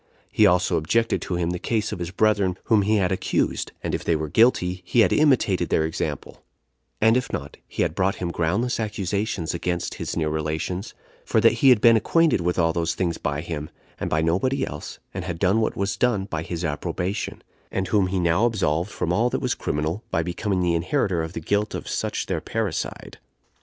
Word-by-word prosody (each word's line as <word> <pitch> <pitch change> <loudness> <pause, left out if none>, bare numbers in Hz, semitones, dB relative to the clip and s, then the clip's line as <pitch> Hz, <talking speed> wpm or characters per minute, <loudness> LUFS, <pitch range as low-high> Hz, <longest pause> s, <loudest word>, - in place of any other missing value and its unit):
He - - +5
also 90 +1 +2
objected 115 +9 +1
to 90 - -3
him 85 0 0
the 90 - -3
case 110 +1 -1
of - - -5
his 85 -1 -3
brethren 100 -1 +2
whom 110 -2 +3
he 105 +2 +2
had 95 -3 +2
accused; 95 - -1
and - - -2
if - - -2
they 85 - +2
were 80 -1 -3
guilty, 90 - +3
he 115 +6 +3
had - - +4
imitated 115 - +3
their 80 - +2
example; 80 - -4 0.6
and 110 +1 +5
if 125 - -1
not, 70 -1 -5
he - - -1
had - - -1
brought 95 +2 +1
him 85 -2 -3
groundless 95 +11 0
accusations 100 -4 -2
against 85 0 -2
his - - -3
near 80 -1 +1
relations; 80 +5 -3 0.3
for - - +1
that - - +6
he 135 - +7
had 120 -5 +6
been 115 -1 +7
acquainted 160 - +2
with 90 +1 0
all 85 -2 +2
those 85 -1 -1
things 85 -2 -1
by 70 0 -2
him, 75 -2 -5 0.3
and - - -2
by 80 +1 +1
nobody 115 +12 +1
else, 75 +1 -7 0.2
and - - -4
had 85 -3 -4
done 95 +6 +2
what 110 - 0
was 100 0 -1
done 105 -3 +1
by 80 -5 -4
his 85 +1 -4
approbation, 90 +6 -3 0.3
and 95 -1 -2
whom 100 -3 +3
he 95 0 -1
now 85 +5 +3
absolved 95 -5 0
from 90 -4 -2
all 115 +6 +2
that - - -1
was - - 0
criminal, 80 +8 -2
by 80 - 0
becoming 90 +2 -1
the 85 -1 +2
inheritor 90 - 0
of 80 +1 -5
the - - -4
guilt 105 +6 -1
of - - -6
such - - -2
their - - -2
parricide. 110 -7 -4
90 Hz, 210 wpm, -24 LUFS, 85-105 Hz, 0.6 s, he